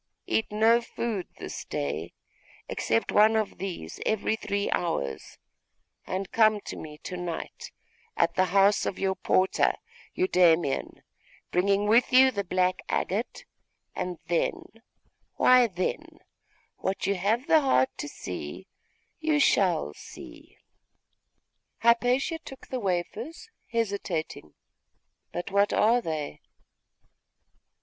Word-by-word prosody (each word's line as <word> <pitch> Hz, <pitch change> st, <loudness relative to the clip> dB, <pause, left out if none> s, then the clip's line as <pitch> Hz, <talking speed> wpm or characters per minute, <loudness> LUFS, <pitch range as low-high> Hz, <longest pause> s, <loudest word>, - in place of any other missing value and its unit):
Eat 220 Hz, -, 0 dB
no 225 Hz, +3 st, +4 dB
food 230 Hz, -4 st, -4 dB
this -, -, -6 dB
day, 75 Hz, +4 st, -4 dB, 0.6 s
except 115 Hz, 0 st, 0 dB
one 215 Hz, +2 st, +5 dB
of 215 Hz, -2 st, -1 dB
these 180 Hz, -, -6 dB
every 220 Hz, 0 st, 0 dB
three 200 Hz, -2 st, -2 dB
hours, 70 Hz, -, -2 dB, 0.7 s
and 190 Hz, 0 st, -3 dB
come 215 Hz, -2 st, +4 dB
to -, -, -7 dB
me 150 Hz, -1 st, -9 dB
to 180 Hz, -, -5 dB
night 175 Hz, -2 st, -6 dB, 0.5 s
at 170 Hz, 0 st, +2 dB
the 185 Hz, -, +3 dB
house 195 Hz, +3 st, +3 dB
of 185 Hz, -, -3 dB
your 190 Hz, 0 st, 0 dB
porter, 190 Hz, 0 st, +2 dB, 0.4 s
Eudaimon, 175 Hz, -, +2 dB, 0.5 s
bringing 200 Hz, +3 st, +2 dB
with 230 Hz, +4 st, +4 dB
you 260 Hz, +1 st, +7 dB
the 200 Hz, -4 st, -2 dB
black 185 Hz, 0 st, 0 dB
agate; 210 Hz, +7 st, -2 dB, 0.5 s
and 180 Hz, -1 st, -3 dB
then 170 Hz, 0 st, 0 dB, 0.7 s
why 255 Hz, -1 st, +6 dB
then, 185 Hz, -3 st, -4 dB, 0.6 s
what 190 Hz, +1 st, -2 dB
you 200 Hz, -, +2 dB
have 210 Hz, +7 st, 0 dB
the 315 Hz, 0 st, +5 dB
heart 130 Hz, -, +2 dB
to -, -, -5 dB
see, 90 Hz, -, -7 dB, 0.5 s
you 310 Hz, -2 st, +1 dB
shall 175 Hz, -, +2 dB
see!' -, -, -13 dB, 1.2 s
Hypatia 245 Hz, +7 st, +2 dB
took 270 Hz, -4 st, -12 dB
the 255 Hz, -, -2 dB
wafers, 225 Hz, -, -3 dB, 0.2 s
hesitating 200 Hz, -, -3 dB, 0.8 s
'But 175 Hz, +3 st, -5 dB
what 200 Hz, +1 st, +3 dB
are 235 Hz, +3 st, +3 dB
they? 155 Hz, -6 st, -4 dB
195 Hz, 115 wpm, -27 LUFS, 175-230 Hz, 1.2 s, you